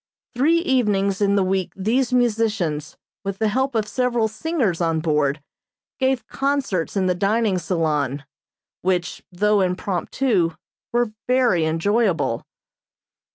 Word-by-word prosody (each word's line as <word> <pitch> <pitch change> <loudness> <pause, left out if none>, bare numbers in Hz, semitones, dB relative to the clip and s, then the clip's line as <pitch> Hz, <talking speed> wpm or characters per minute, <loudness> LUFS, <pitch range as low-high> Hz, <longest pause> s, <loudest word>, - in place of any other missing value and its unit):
Three 295 +7 +3
evenings 205 - +1
in 200 0 +3
the 200 - +3
week 185 -1 -1
these 240 +7 0
musicians, 215 -11 0 0.3
with 195 -1 -3
the 220 +1 +1
help 265 +3 0
of 215 -2 +1
several 240 -1 +1
singers 220 - -1
on 165 -1 +1
board, 150 -2 0 0.6
gave 260 -3 +1
concerts 270 - -1
in 190 - +2
the 180 - +2
dining 200 +1 +1
salon, 150 -6 -1 0.6
which, 180 -1 -1
though 205 +3 +2
impromptu, 180 0 0 0.4
were 240 -2 +1 0.2
very 245 -10 +3
enjoyable. 165 - +1
200 Hz, 120 wpm, -22 LUFS, 175-240 Hz, 0.6 s, Three